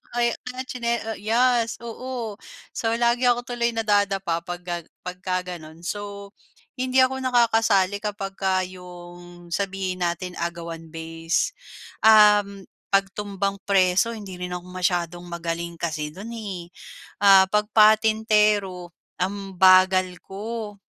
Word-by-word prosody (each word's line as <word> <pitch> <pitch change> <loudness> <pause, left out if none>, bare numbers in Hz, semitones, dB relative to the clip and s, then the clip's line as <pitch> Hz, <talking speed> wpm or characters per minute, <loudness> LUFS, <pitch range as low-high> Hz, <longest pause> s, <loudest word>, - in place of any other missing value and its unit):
kay, 235 -1 +2 0.3
tsine 235 -2 -2 0.2
yes, 235 +2 +2
oo. 235 -2 -6 0.3
So, 225 0 -1
lagi 240 +1 +2
ako 245 0 +2
tuloy 235 -1 -2
nadadapa 200 -5 +1
pagka 175 -1 -6 0.2
pagka 185 0 -3
gano'n. 160 -1 -10
So, 200 +1 -6 0.5
hindi 260 0 +3
ako 265 +1 0
nakakasali 225 -6 +2
kapag 205 -2 -4
ka 190 -1 +1
'yong 175 -1 -11
sabihin 190 -1 -2
natin 180 +1 -5
agawan 170 -1 -5
base, 165 +1 -2 0.5
uhm, 210 -2 +5 0.2
'pag 195 -1 +2
tumbang 200 -1 -3
preso, 195 +3 +3
hindi 195 -4 -9
rin 180 0 -4
ako 175 - -6
masyadong 175 -1 -2
magaling 170 0 -4
kasi 160 -3 -3
do'n 195 +10 -9
eh. 195 -7 -7 0.5
Ah, 195 -1 +8
pag 210 +2 0
patintero 215 -4 +3 0.3
ang 195 +1 -3
bagal 185 0 +5
ko, 215 +2 -6
195 Hz, 120 wpm, -24 LUFS, 180-220 Hz, 0.5 s, Ah